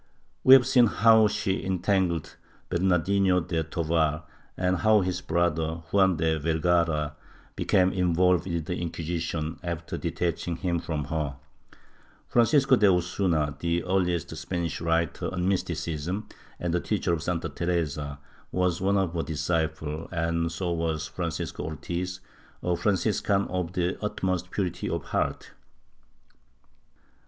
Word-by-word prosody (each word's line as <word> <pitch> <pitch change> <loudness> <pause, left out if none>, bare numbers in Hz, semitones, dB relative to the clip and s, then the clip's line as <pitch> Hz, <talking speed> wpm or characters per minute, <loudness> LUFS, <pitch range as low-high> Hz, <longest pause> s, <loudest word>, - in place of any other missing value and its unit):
We 130 - +10
have 130 -2 +5
seen 120 -2 +5
how 110 0 +5
she 105 -2 -1
entangled 95 -3 0 0.3
Bernardino 90 +1 +2
de 80 -1 -2
Tovar 80 -1 0 0.3
and 90 0 +1
how 110 +2 +4
his 90 -1 -2
brother, 80 -1 0
Juan 95 -3 +4
de 80 0 +1
Vergara, 80 -1 +1 0.4
became 95 0 +2
involved 90 0 +2
with 85 -3 -2
the 90 +1 -3
Inquisition, 85 -1 -3
after 85 -1 -4
detaching 85 0 -2
him 85 -1 -1
from 80 -3 -3
her. 70 -1 -3 0.9
Francisco 135 +3 +4
de 105 - +5
Osuna, 85 -4 0
the 85 0 0
earhest 90 -3 0
Spanish 85 +1 -3
writer 85 -2 0
on 90 -1 -1
mysticism 90 +1 -2 0.3
and 85 -1 -2
the 85 - +2
teacher 90 -2 -1
of 80 - -1
Santa 85 0 -2
Teresa, 75 -4 -2 0.3
was 90 -1 0
one 100 +1 +2
of 95 -4 0
her 85 - -1
disciples 80 0 -2
and 85 -1 0
so 85 +1 -2
was 80 -2 -1
Francisco 85 -1 -4
Ortiz, 85 +4 -4 0.4
a 90 0 +1
Franciscan 100 +1 +1
of 90 -1 -2
the 90 +3 -1
utmost 90 -3 -1
pui'ity 90 -3 -2
of 85 -3 -2
heart. - - -2
85 Hz, 130 wpm, -27 LUFS, 80-95 Hz, 0.9 s, We